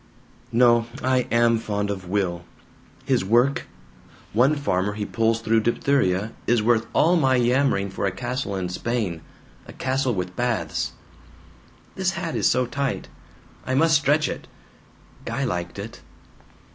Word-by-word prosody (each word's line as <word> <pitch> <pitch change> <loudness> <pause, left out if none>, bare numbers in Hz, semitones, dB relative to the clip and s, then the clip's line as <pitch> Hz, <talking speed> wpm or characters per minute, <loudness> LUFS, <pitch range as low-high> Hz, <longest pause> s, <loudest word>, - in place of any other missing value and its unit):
"No. 120 -1 +4 0.2
I 130 -1 +2
am 115 -1 +3
fond 105 -2 -2
of 95 -2 -6
Will. 90 -3 -1 0.6
His - - +2
work 120 +7 +2 0.7
one 130 +8 +4
farmer 105 -8 0
he 105 0 -4
pulls 115 0 0
through 115 0 +2
diphtheria 110 -4 +1 0.2
is 120 -3 +3
worth 115 0 +2
all 170 +3 +4
my 135 -5 +3
yammering 125 -5 +2
for 100 - -2
a - - 0
castle 120 +2 -3
in 90 -2 -2
Spain. 100 -4 -2 0.5
A - - -10
castle 130 -2 -1
with 90 -1 -4
baths. 120 -3 -1 1.0
"This 190 0 -1
hat 170 -3 -4
is - - +3
so 125 0 +2
tight. 140 +2 -3 0.6
I 130 - 0
must 160 +4 +4
stretch 145 +1 +3
it. - - -6 0.8
Guy 135 - -3
liked 90 -8 -3
it. 105 +3 -8
120 Hz, 145 wpm, -24 LUFS, 100-130 Hz, 1.0 s, No